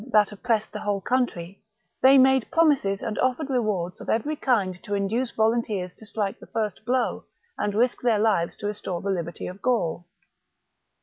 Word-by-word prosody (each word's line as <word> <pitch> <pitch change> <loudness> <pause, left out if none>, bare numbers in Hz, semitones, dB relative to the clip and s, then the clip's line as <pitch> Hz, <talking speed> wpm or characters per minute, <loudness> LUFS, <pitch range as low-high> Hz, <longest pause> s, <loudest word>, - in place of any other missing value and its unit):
that 210 -2 +4
oppressed 220 0 -1
the 210 - -4
whole 205 -1 -1
country, 200 -6 -2 0.4
they 270 +1 +7
made 265 -2 +4
promises 280 -12 +2
and 220 - -3
offered 265 +3 0
rewards 205 -8 -1
of - - -8
every 290 +8 0
kind 200 -11 0
to 205 -3 -2
induce 220 +6 0
volunteers 220 -5 0
to 220 - -13
strike 205 -2 -3
the - - -13
first 215 -2 -3
blow 250 +1 0 0.4
and 205 -1 -1
risk 240 +3 +1
their 235 -3 +3
lives 205 -6 +1
to - - -8
restore 205 -4 -3
the 195 +3 -2
liberty 170 -3 -4
of 185 +2 -8
Gaul. 175 -9 0
215 Hz, 175 wpm, -25 LUFS, 195-245 Hz, 0.4 s, they